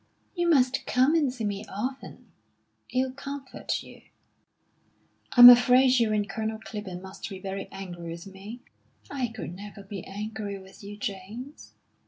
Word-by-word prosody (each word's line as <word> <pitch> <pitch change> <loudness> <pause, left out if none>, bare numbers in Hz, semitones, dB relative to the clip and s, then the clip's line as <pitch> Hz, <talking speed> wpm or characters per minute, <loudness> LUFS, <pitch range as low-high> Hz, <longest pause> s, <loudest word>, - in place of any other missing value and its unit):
"You 345 -2 0
must 265 -4 +3
come 260 +4 +3
and 300 -6 +2
see 250 -3 -6
me 205 -1 -2
often. 255 +7 -6 0.6
It'll 260 0 0
comfort 275 0 -5
you." - - -14 1.3
"I'm 245 -1 +12
afraid 250 +1 +7
you 225 -2 +2
and 210 -1 0
Colonel 220 +2 -3
Clibborn 205 -4 -7
must 190 +3 -8
be 195 - -7
very 195 +1 -5
angry 175 -3 -7
with 170 +1 -7
me?" 200 +5 -10 0.5
"I 265 -3 -1
could 220 -6 -7
never 200 +2 -10
be 195 -2 -7
angry 205 0 -5
with 190 +1 -15
you, 205 +1 -8
James.... 210 +8 -7
215 Hz, 150 wpm, -27 LUFS, 195-255 Hz, 1.3 s, I'm